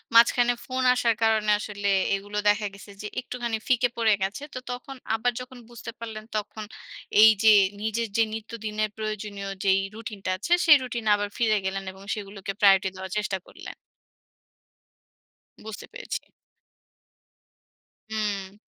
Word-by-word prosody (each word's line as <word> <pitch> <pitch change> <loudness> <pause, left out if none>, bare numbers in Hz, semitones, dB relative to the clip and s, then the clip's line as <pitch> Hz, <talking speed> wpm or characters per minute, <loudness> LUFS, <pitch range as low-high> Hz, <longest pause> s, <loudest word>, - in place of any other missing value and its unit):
মাঝখানে 240 +1 +6
ফোন 260 0 -2
আসার 235 -3 +2
কারণে 220 -1 +3
আসলে 205 -1 -4 0.3
এগুলো 205 +1 -6
দেখা 210 0 +2
গেছে 200 +1 -12
যে 210 - -4
একটুখানি 240 -2 -3
ফিকে 250 -2 +3
পড়ে 225 -2 +4
গেছে। 205 +9 -3
তো 255 - -4
তখন 250 +2 -7 0.2
আবার 245 +2 +1
যখন 250 0 -10
বুঝতে 235 -1 -8
পারলেন, 220 -2 -6
তখন 215 +1 -5 0.6
এইযে 220 0 +7 0.3
নিজের 220 +2 -1
যে 225 - +6
নিত্যদিনের 215 -1 -3
প্রয়োজনীয় 210 -2 -4
যেই 195 -1 +4 0.2
রুটিনটা 215 -4 -6
আছে, 270 - -6
সেই 300 -3 +9
রুটিনে 235 -3 -2
আবার 205 0 -2
ফিরে 220 -3 +3
গেলেন 195 0 -2
এবং 190 +1 -14
সেগুলোকে 200 -1 -6
প্রায়োরিটি 195 -2 +6
দেওয়ার 190 0 -7
চেষ্টা 210 -2 -1
করলেন। - - -10 1.9
বুঝতে 220 -1 -7
পেরেছি। - - -5 1.9
হুম। 205 -3 -3
215 Hz, 135 wpm, -26 LUFS, 205-235 Hz, 1.9 s, সেই